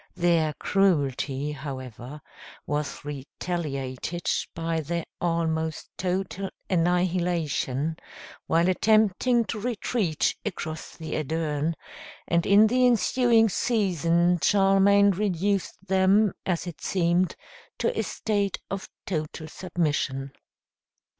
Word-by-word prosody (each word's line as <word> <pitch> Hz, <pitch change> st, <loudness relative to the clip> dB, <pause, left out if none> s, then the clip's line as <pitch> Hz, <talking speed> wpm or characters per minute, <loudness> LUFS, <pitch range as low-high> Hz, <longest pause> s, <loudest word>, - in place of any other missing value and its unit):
Their 170 Hz, -3 st, +2 dB
cruelty, 145 Hz, -7 st, +1 dB
however, 135 Hz, -1 st, -7 dB, 0.4 s
was 150 Hz, 0 st, -3 dB
retaliated 145 Hz, +1 st, -4 dB, 0.3 s
by 165 Hz, 0 st, -1 dB
their 170 Hz, +2 st, -3 dB, 0.2 s
almost 160 Hz, -2 st, -1 dB
total 190 Hz, +1 st, -2 dB, 0.2 s
annihilation 170 Hz, -5 st, 0 dB, 0.5 s
while 170 Hz, +2 st, +3 dB
attempting 220 Hz, +4 st, +3 dB
to 220 Hz, -, -4 dB
retreat 215 Hz, -6 st, 0 dB
across 160 Hz, -6 st, -5 dB
the 160 Hz, -1 st, -6 dB
Adern, 155 Hz, +1 st, -1 dB, 0.5 s
and 170 Hz, 0 st, +1 dB
in 205 Hz, +2 st, +7 dB
the 250 Hz, +3 st, +2 dB
ensuing 235 Hz, 0 st, +4 dB
season 175 Hz, -, +1 dB
Charlemagne 200 Hz, 0 st, +5 dB
reduced 195 Hz, 0 st, -1 dB
them, 190 Hz, +2 st, +3 dB
as 175 Hz, -2 st, 0 dB
it 170 Hz, -4 st, -8 dB
seemed, 180 Hz, 0 st, +1 dB, 0.4 s
to 485 Hz, -, 0 dB
a -, -, +1 dB
state 205 Hz, -3 st, -1 dB
of 195 Hz, -1 st, -4 dB, 0.2 s
total 155 Hz, -2 st, -4 dB
submission. 150 Hz, -5 st, -2 dB
175 Hz, 95 wpm, -26 LUFS, 155-195 Hz, 0.5 s, in